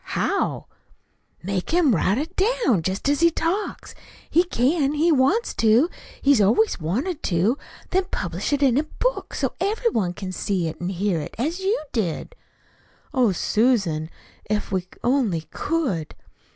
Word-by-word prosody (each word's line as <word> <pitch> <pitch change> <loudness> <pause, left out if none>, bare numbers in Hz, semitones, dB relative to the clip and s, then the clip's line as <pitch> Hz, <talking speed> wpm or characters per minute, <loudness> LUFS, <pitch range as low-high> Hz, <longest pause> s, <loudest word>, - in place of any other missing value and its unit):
"How?" - - 0 0.8
"Make 190 0 -2
him 330 -6 +4
write 190 +5 +2
it 300 +4 -4
down, 420 - +2
jest 190 +9 -2
as 285 0 +2
he 335 +1 +6
talks. 340 +5 -2 0.4
He 340 - +5
can 285 -2 +1
he 325 +3 +3
wants 305 - +2
to. 230 +10 +4 0.3
He's 280 -5 +5
always 215 -1 +3
wanted 260 - -2
to. 195 - +1 0.3
Then 375 0 +2
publish 180 - -3
it 285 0 +1
in 265 -1 +4
a - - +1
book, - - -3
so - - -1
everybody 400 - 0
can 185 +1 -6
see 185 -2 -1
it 160 - -7
and 175 - -2
hear 190 -2 0
it, 145 - -8
as 315 - -1
you 390 +4 +1
did." 210 - -2 0.8
"Oh, 250 -5 +3
Susan, 190 -6 +1 0.4
if 210 -1 -1
we 185 -2 -1 0.2
only 240 - +1
could!" 260 - -2
245 Hz, 150 wpm, -23 LUFS, -, 0.8 s, he